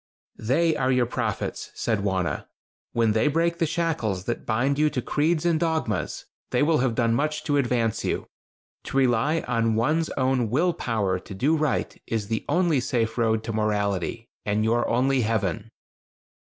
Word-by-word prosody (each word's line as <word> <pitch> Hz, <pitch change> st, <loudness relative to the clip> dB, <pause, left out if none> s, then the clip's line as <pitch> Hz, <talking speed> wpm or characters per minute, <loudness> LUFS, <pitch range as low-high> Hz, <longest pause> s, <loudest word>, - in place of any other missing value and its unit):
"They 155 Hz, +8 st, +2 dB
are 130 Hz, 0 st, +1 dB
your 125 Hz, -1 st, +3 dB
prophets," 115 Hz, -3 st, -3 dB
said 110 Hz, -3 st, 0 dB
Wauna. 95 Hz, -3 st, -1 dB, 0.5 s
"When 115 Hz, -2 st, +2 dB
they 110 Hz, +5 st, +2 dB
break 170 Hz, +3 st, +1 dB
the 165 Hz, -, +2 dB
shackles 155 Hz, -, -1 dB
that 120 Hz, +3 st, -4 dB
bind 130 Hz, +5 st, +1 dB
you 155 Hz, 0 st, +4 dB
to 130 Hz, -, -2 dB
creeds 155 Hz, +6 st, 0 dB
and 165 Hz, -2 st, +2 dB
dogmas, 160 Hz, -1 st, -1 dB, 0.2 s
they -, -, +2 dB
will 155 Hz, +1 st, +3 dB
have 125 Hz, -2 st, +1 dB
done 115 Hz, -1 st, +2 dB
much 150 Hz, +4 st, -1 dB
to 145 Hz, -1 st, +1 dB
advance 120 Hz, -4 st, 0 dB
you. -, -, -1 dB, 0.6 s
To -, -, -3 dB
rely 135 Hz, +5 st, +2 dB
on 115 Hz, -2 st, 0 dB
one's 155 Hz, +8 st, +1 dB
own 130 Hz, -3 st, +1 dB
will 165 Hz, +9 st, +2 dB
power 100 Hz, -, -1 dB
to 95 Hz, -, -10 dB
do 145 Hz, +11 st, +2 dB
right 155 Hz, -3 st, -1 dB
is 110 Hz, -2 st, -2 dB
the 110 Hz, -1 st, -1 dB
only 175 Hz, -5 st, +3 dB
safe 120 Hz, -3 st, -1 dB
road 110 Hz, -2 st, +1 dB
to 115 Hz, -, -4 dB
morality, 105 Hz, 0 st, -1 dB, 0.2 s
and 105 Hz, +1 st, 0 dB
your 115 Hz, +2 st, +1 dB
only 130 Hz, +2 st, +2 dB
heaven." 110 Hz, -1 st, -1 dB
120 Hz, 170 wpm, -25 LUFS, 110-150 Hz, 0.6 s, you